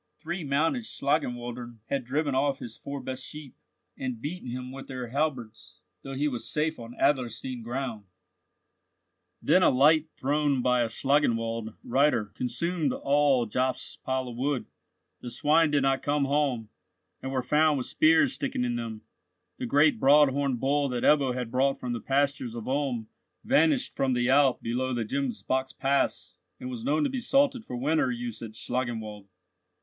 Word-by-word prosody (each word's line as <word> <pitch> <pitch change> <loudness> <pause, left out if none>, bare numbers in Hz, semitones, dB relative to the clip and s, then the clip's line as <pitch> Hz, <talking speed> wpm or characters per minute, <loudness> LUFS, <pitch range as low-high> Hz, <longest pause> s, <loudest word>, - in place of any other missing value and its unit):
Three 170 +2 -5
mounted 155 - +1
Schlangenwaldern 120 - -3
had 135 +3 -2
driven 145 +3 -1
off 135 +1 +1
his 115 -4 -9
four 140 +4 -6
best 130 0 -5
sheep, 150 -2 -10 0.4
and 130 -3 -4
beaten 145 +1 -5
himself 125 +1 -6
with 135 0 -9
their 125 -3 -6
halberds, 130 -5 -3 0.2
though 135 0 -7
he 145 +3 +1
was 125 -5 -3
safe 155 +1 -1
on 115 +1 -9
Adlerstein 125 -2 0
ground. 120 -3 -4 1.4
Then - - +4
a - - +6
light 150 +4 +4
thrown 140 -2 +1
by 125 -1 +3
a 120 - +1
Schlangenwald 115 -4 0
reiter 125 -4 +2
consumed 155 +5 -1
all 140 -3 +2
Jobst's 125 +4 -1
pile 130 -1 -2
of 120 - -7
wood. 135 0 -1 0.5
The 120 - -7
swine 150 +6 +3
did 145 -2 +2
not 135 0 +2
come 145 -1 +1
home, 135 -6 0 0.5
and 135 - -4
were 130 -2 -1
found 150 +1 +3
with 125 - -3
spears 160 +1 +4
sticking 135 -2 -2
in 120 -1 -1
them; 115 -2 -6 0.6
the 125 - -3
great 145 0 +4
broad 145 +2 +6
horned 135 -2 -1
bull 140 +2 +1
that 125 -1 -3
Ebbo 140 -4 +4
had 125 -3 -4
brought 135 +2 +1
from 125 -1 -3
the 120 - -4
pastures 140 -3 0
of 115 - -6
Ulm 130 -5 -1 0.4
vanished 275 +3 +2
from 135 -1 +1
the 120 0 +1
Alp 135 -2 +4
below 125 +2 -1
the 115 -2 -1
Gemsbock's 130 +1 -2
Pass, 140 +1 0 0.3
and 125 - -6
was 120 -3 -6
known 150 +3 +1
to - - +1
be 265 - -2
salted 270 0 +2
for 125 - -7
winter 150 +2 +1
use 120 -2 -4
at 110 -2 -7
Schlangenwald. 110 -5 -3
130 Hz, 170 wpm, -27 LUFS, 120-145 Hz, 1.4 s, a